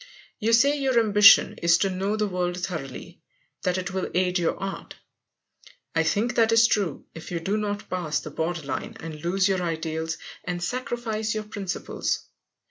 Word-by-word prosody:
You 225 0 +1
say 280 +5 +4
your 260 -3 +3
ambition 210 -2 +6
is 170 0 +5
to 195 +2 +1
know 195 +3 -1
the 215 - +1
world 180 -1 -2
thoroughly, 160 -8 -6 0.4
that 180 0 0
it 185 +1 -4
will 190 -1 -2
aid 180 0 +2
your 170 - 0
art. 195 0 -6 1.0
I 165 - +3
think 210 +9 +1
that 225 -2 +3
is 225 0 +6
true, 200 -9 0
if 160 -1 -9
you 175 -2 -2
do 195 +5 -1
not 205 -1 -3
pass 165 -5 -1
the 155 - -8
border 165 +1 -2
line 140 - -5
and 155 -2 -8
lose 185 +2 +2
your 190 -2 +1
ideals 160 -1 -3 0.3
and 175 -1 -3
sacrifice 220 -1 -2
your 215 - -2
principles. 200 -4 -3
185 Hz, 175 wpm, -25 LUFS, 170-215 Hz, 1.0 s, ambition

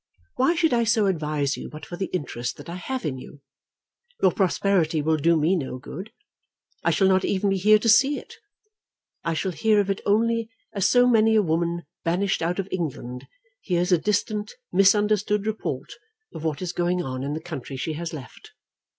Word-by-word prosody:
Why 300 +7 +2
should 325 -4 +2
I 235 -1 +3
so 225 -2 +3
advise 150 -6 0
you - - -7
but 155 0 -9
for 175 - -7
the 190 +2 -3
interest 125 -8 -4
that - - -11
I 170 - -6
have 260 +8 -4
in 130 -4 -2
you? 140 +2 -12 0.8
Your 190 - +4
prosperity 180 -4 +1
will 160 +2 +2
do 165 +2 +3
me 160 +5 +2
no 135 -6 -3
good. 185 +11 -8 0.7
I - - +3
shall 195 - +3
not 190 0 +3
even 200 0 +1
be 195 - +1
here 215 +3 +6
to 215 - -3
see 265 +6 +5
it. - - -10 0.9
I 165 -1 -1
shall 190 +3 -1
hear 215 +4 +2
of 200 -1 +1
it 195 - -3
only 230 +2 +1 0.2
as 195 -2 +2
so 245 0 +5
many 225 -2 +4
a 215 - +4
woman 170 0 -1 0.2
banished 185 +4 0
out 170 +2 -1
of 195 -1 -2
England 130 -8 -4 0.3
hears 180 - 0
a 175 - +5
distant 210 +2 -1 0.2
misunderstood 205 +1 +3
report 215 -11 -3 0.4
of 155 - -7
what 155 +1 -2
is 175 - -3
going 175 +1 0
on 130 -1 -4
in 140 +2 -3
the - - -3
country 155 -5 -7
she 155 +4 -3
has 165 +2 -5
left. 135 -7 -10
185 Hz, 195 wpm, -24 LUFS, 160-210 Hz, 0.9 s, here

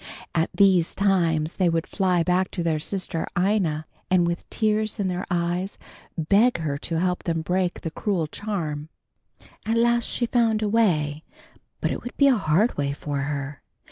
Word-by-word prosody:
At 165 -1 +1
these 190 -4 +3
times 170 -5 +1
they 185 -3 +3
would 165 -1 0
fly 180 -3 +1
back 180 +2 +1
to 175 - -3
their 160 -2 +1
sister 170 0 -3
Ina, 175 -5 +1 0.2
and 180 -2 +4
with 170 0 -3
tears 215 -1 0
in 195 -2 0
their 180 +1 -3
eyes, 175 +2 -1 0.4
beg 200 +9 +3
her 150 -4 -3
to 165 +1 -3
help 180 0 0
them 165 -2 -2
break 180 +1 -1
the 165 - -4
cruel 185 -3 -1
charm. 155 -4 -4 0.7
At 225 +2 0
last 235 0 +3
she 240 - 0
found 225 -2 +2
a 210 - +1
way, 160 -9 +1 0.6
but - - 0
it - - -3
would 245 - -8
be 280 - +5
a 260 - +5
hard 200 +3 +2
way 140 -1 0
for 145 0 -4
her. 140 0 -4
180 Hz, 175 wpm, -24 LUFS, 160-205 Hz, 0.7 s, be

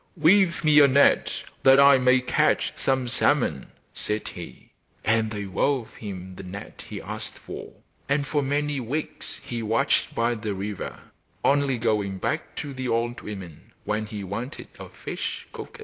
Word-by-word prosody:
'Weave 170 +2 +4
me 150 -1 +6
a 145 - +8
net 140 +1 +3 0.2
that 135 +1 +7
I 140 -1 +8
may 125 0 +4
catch 125 - +2
some 130 -2 0
salmon,' 120 - +1 0.3
said 105 0 -2
he. 85 -2 -10 0.3
And 110 0 +2
they 105 -1 -4
wove 125 +5 0
him 95 -3 -7
the - - -6
net 95 +2 -9
he - - -5
asked - - -7
for, - - -8 0.4
and 140 0 +2
for 145 +1 0
many 145 +1 0
weeks 135 +6 -4
he 120 -1 -4
watched 115 +6 +1
by 115 +1 +2
the 105 -3 -3
river, 100 +1 -5 0.5
only 140 -2 +3
going 105 -4 0
back - - -3
to 145 -2 -5
the 130 -1 -4
old 120 +1 -1
women 95 -7 -9
when 105 +1 -2
he 105 -1 -6
wanted 115 - -6
a - - -8
fish - - -5
cooked. 485 - -9
120 Hz, 165 wpm, -25 LUFS, 105-140 Hz, 0.5 s, a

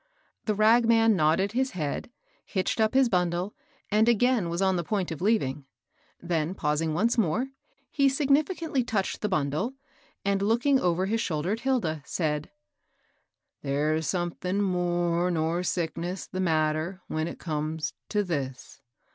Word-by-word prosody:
The 215 - +1
ragman 225 +1 +5
nodded 170 +4 +2
his 260 +3 0
head, 150 +4 -3 0.3
hitched 190 +3 -1
up 220 +3 +2
his 265 -1 +5
bundle, 180 -1 0 0.4
and 215 +3 +4
again 235 -5 +2
was 170 +1 -2
on 190 -1 +2
the 175 - -1
point 190 -1 -2
of 160 - -5
leaving; 150 -10 0 0.5
then, 170 0 -1
pausing 155 -1 0
once 230 +7 +2
more, 225 +7 +1 0.4
he 275 -2 +3
significantly 290 +1 +1
touched 215 -5 -2
the 210 - 0
bundle, 155 - -1 0.5
and 200 0 +1
looking 240 +7 +3
over 180 -1 +1
his 225 +3 0
shoulder 165 -3 -1
at 220 - -1
Hilda, 230 - 0
said: 150 -1 -2 0.5
" - - -46
There's 150 +3 0
somethin' 180 +2 -1
more 175 -1 +1
nor 165 0 0
sickness 175 +1 -2
th' 185 - -4
matter 160 +2 0
when 155 +1 -2
it - - -6
comes 155 -1 -3 0.2
t' 210 -1 +1
this. 135 -8 -5
180 Hz, 145 wpm, -27 LUFS, 160-225 Hz, 0.5 s, ragman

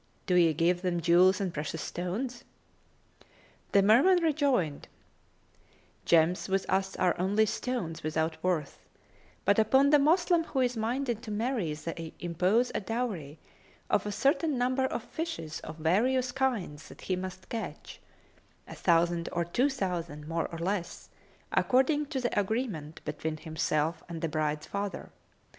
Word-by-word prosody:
Do 180 - 0
ye 170 -2 +5
give 170 +3 +1
them 180 -2 0
jewels 180 +3 +5
and 190 -4 -2
precious 150 +2 -4
stones?" 235 +8 -4 1.3
The 200 - +5
Merman 295 - +5
rejoined, 275 - +1 1.2
"Gems 170 +3 +3
with 195 0 0
us 190 +1 0
are 180 -1 +2
only 205 +4 +3
stones 205 -8 -3
without 160 +1 -2
worth: 175 -5 -2 0.6
but 200 +2 +4
upon 265 +6 +4
the 295 - +7
Moslem 335 +3 +3
who 270 - -1
is 250 -1 +1
minded 235 +1 -1
to 235 - -9
marry 215 - -1
they 165 +1 -6
impose 185 +8 +1
a - - -1
dowry 195 - -3 0.5
of 205 - +2
a - - -2
certain 280 +5 +1
number 255 +2 +1
of 250 - -3
fishes 320 - -5
of 155 0 -9
various 245 +11 +2
kinds 240 - -2
that - - -13
he 185 - -1
must 185 0 -7
catch, 230 -1 -6 0.7
a - - -8
thousand 170 -1 +2
or 170 0 -1
two 245 - +1
thousand, 175 - -4
more 165 0 -1
or 165 - -8
less, 180 +1 -3 0.4
according 285 +4 +2
to 275 -3 -3
the 240 -4 0
agreement 200 - -3
between 155 +1 -3
himself 160 +1 -1
and 165 -2 -6
the 165 - 0
bride's 155 0 -1
father. 200 +2 -4
190 Hz, 150 wpm, -29 LUFS, 165-250 Hz, 1.3 s, the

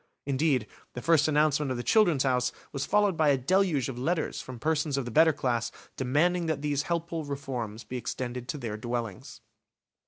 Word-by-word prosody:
Indeed, 140 -3 +1 0.3
the 125 - -5
first 165 -3 +4
announcement 150 -1 +2
of 130 - -2
the 120 - -4
"Children's 175 - +4
House" 125 -2 +1 0.2
was 140 -1 -3
followed 205 -3 +3
by 155 -2 +3
a 140 - +4
deluge 165 -1 +2
of 125 -2 -5
letters 160 +5 -1
from 130 -1 -8
persons 150 +1 0
of 135 - -1
the 120 - -5
better 160 +5 +6
class 120 -5 -1 0.2
demanding 165 +7 +1
that 155 -2 -2
these 145 -1 +1
helpful 170 -1 -2
reforms 125 -6 -5
be 130 - -5
extended 125 +1 -4
to 150 - -3
their 115 -6 -4
dwellings. 115 -3 -5
140 Hz, 185 wpm, -28 LUFS, 125-160 Hz, 0.3 s, better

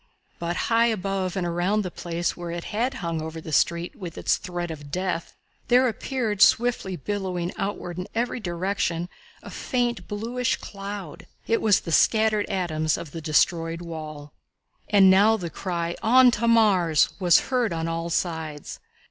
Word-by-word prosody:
But 170 +1 -2
high 230 +4 +2
above 195 -4 -2
and 180 - -1
all 170 - -2
around 195 +5 +1
the 180 - -5
place 170 0 -3
where 175 -1 -6
it 170 0 -4
had 245 +5 -2
hung 165 -3 -3
over 160 +1 -6
the 160 - -8
street 170 +4 +1
with 175 -5 -8
its - - +1
threat 175 -1 -5
of 145 -2 -9
death 180 +1 -3 0.3
there 250 +1 +5
appeared, 230 -3 -2
swiftly 230 -6 +3
billowing 180 0 -3
outward 180 -3 -4
in 180 - -5
every 240 +2 -1
direction, 175 -2 -2 0.3
a - - -9
faint, 240 - -2
bluish 235 +4 -1
cloud. 200 -4 -8 0.2
It 230 - +1
was 210 -3 +4
the 165 - -6
scattered 215 +3 +3
atoms 155 -4 0
of 160 - -8
the 165 - -6
destroyed 165 +2 +1
wall. 155 -3 -8 0.6
And 195 -2 +6
now 210 +4 +5
the 175 -5 -5
cry 170 -2 -3
"On 250 +2 +6
to 235 0 -1
Mars!" 190 -9 +4
was 175 -3 +4
heard 245 -5 +1
on 165 -1 -2
all 165 +1 -3
sides. 160 -4 -3
180 Hz, 165 wpm, -25 LUFS, 170-215 Hz, 0.6 s, And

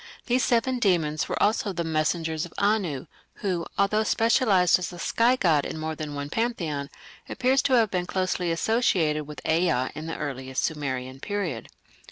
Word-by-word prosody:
These 250 0 +2
seven 245 +2 +1
demons 165 -8 +1
were - - -2
also 210 -1 +1
"the 170 - -2
messengers 160 0 -1
of 175 - -9
Anu", 200 -10 0 0.3
who, 180 -4 -2
although 200 +2 +2
specialized 215 -6 +3
as 180 - -4
a 175 - -9
sky 235 +7 +2
god 165 - +2
in - - -5
more 160 0 -3
than 150 -1 -6
one 145 0 -5
pantheon, 165 -12 -2 0.4
appears 260 +1 +2
to 270 - +1
have 225 -4 +4
been 180 -2 -1
closely 185 -2 -1
associated 165 -6 +1
with 150 - -8
Ea 160 -6 +2
in 155 +1 -7
the 165 - -4
earliest 130 -2 -3
Sumerian 130 -4 -4
period. 180 - -3
175 Hz, 170 wpm, -26 LUFS, 150-210 Hz, 0.4 s, have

